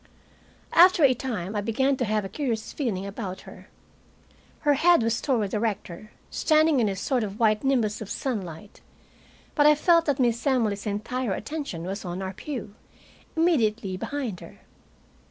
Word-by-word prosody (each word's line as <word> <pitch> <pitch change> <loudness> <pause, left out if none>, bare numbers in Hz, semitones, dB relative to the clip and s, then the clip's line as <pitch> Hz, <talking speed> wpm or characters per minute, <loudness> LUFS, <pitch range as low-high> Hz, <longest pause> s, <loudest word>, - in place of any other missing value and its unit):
After 355 -1 +6
a 265 -2 +6
time 220 -6 -4
I 205 - 0
began 265 +6 +1
to 250 - 0
have 215 -1 0
a - - -3
curious 225 0 -3
feeling 210 -9 -2
about 195 -2 -6
her. - - -14 0.9
Her 295 -2 +3
head 330 -1 +4
was 230 0 0
toward 225 -8 0
the 210 - -1
rector, 215 -3 -4 0.2
standing 310 -2 +3
in 220 -3 +2
a 195 - -2
sort 245 +5 -1
of 205 0 -6
white 215 -2 +2
nimbus 235 -7 +1
of 210 - -7
sunlight, 200 - -5 0.7
but 295 -1 +4
I 300 - +7
felt 335 +2 +4
that 285 -3 0
Miss 240 +1 +1
Emily's 220 -6 +1
entire 210 +2 -2
attention 275 - -5
was 195 +3 -5
on 180 +1 -5
our 190 0 -4
pew, 245 -2 -6 0.6
immediately 230 - +1
behind 240 -2 -4
her. - - -13
230 Hz, 165 wpm, -26 LUFS, 200-275 Hz, 0.9 s, I